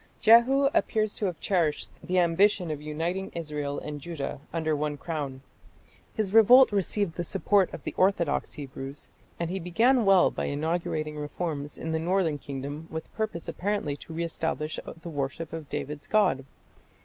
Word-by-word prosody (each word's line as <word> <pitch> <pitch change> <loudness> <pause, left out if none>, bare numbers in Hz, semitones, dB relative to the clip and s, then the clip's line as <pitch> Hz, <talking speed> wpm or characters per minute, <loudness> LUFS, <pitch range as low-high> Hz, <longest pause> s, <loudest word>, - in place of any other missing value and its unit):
Jehu 240 +5 +6
appears 215 -2 +1
to 205 - -1
have 175 -3 -4
cherished 170 -6 0
the 185 0 -1
ambition 180 0 +3
of 150 -1 -4
uniting 165 +6 -3
Israel 150 -3 -3
and 150 -1 -6
Judah 160 -4 -5
under 160 -2 0
one 150 0 -2
crown. 145 -4 -4 0.7
His 210 -3 -1
revolt 240 +4 +8
received 200 -2 0
the 175 - -1
support 195 +2 +2
of - - -8
the - - -4
orthodox 185 -5 +1
Hebrews, 135 0 -7 0.3
and 170 0 -2
he 190 - -2
began 230 +9 +3
well 195 -3 +5
by - - -3
inaugurating 155 0 -2
reforms 150 -1 -4
in 160 - -4
the 160 - 0
northern 170 -3 +1
kingdom 140 +3 -6
with 160 0 -7
purpose 215 -7 -3
apparently 195 -7 -2
to 165 - -12
re 170 +1 -2
establish 160 -2 -2 0.2
the 170 - -7
worship 145 +2 -4
of 160 -4 -6
David's 145 +1 -5
God. 170 -11 +2
165 Hz, 160 wpm, -27 LUFS, 150-195 Hz, 0.7 s, revolt